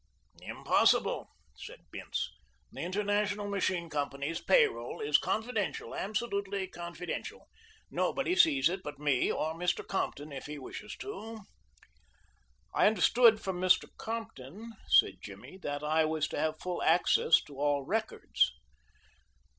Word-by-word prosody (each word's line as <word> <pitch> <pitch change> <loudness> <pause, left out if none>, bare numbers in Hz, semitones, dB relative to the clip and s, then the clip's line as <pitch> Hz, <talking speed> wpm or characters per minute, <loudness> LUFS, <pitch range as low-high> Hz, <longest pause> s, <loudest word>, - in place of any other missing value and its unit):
"Impossible," - - +2 0.3
said - - -10
Bince. - - -4 0.4
"The - - -10
International 205 +2 0
Machine 185 -3 -1
Company's 145 +1 -3
pay 485 -2 +5
roll 425 - -7
is 435 -1 +3
confidential, 220 -2 -2
absolutely 200 -2 -2
confidential. 175 -1 -6 0.4
Nobody 360 - 0
sees 320 -6 +5
it 185 +3 -3
but 150 -5 -7
me 145 -3 +1
or 160 +1 -1
Mr. 175 +2 -1
Compton 155 -6 -3
if 140 - -7
he 150 0 -6
wishes 210 +10 -8
to." 225 - -7 1.3
"I - - +5
understood 220 +2 +5
from 185 -2 -3
Mr. 185 0 +4
Compton," 225 - -7
said - - +5
Jimmy, 190 - -11
"that 145 -1 -4
I 155 +1 +2
was 155 -1 0
to - - -3
have 155 0 -1
full 180 -1 -3
access 165 -1 +4
to 140 -2 -12
all 145 -1 +1
records." 220 +8 0
185 Hz, 130 wpm, -31 LUFS, 155-215 Hz, 1.3 s, pay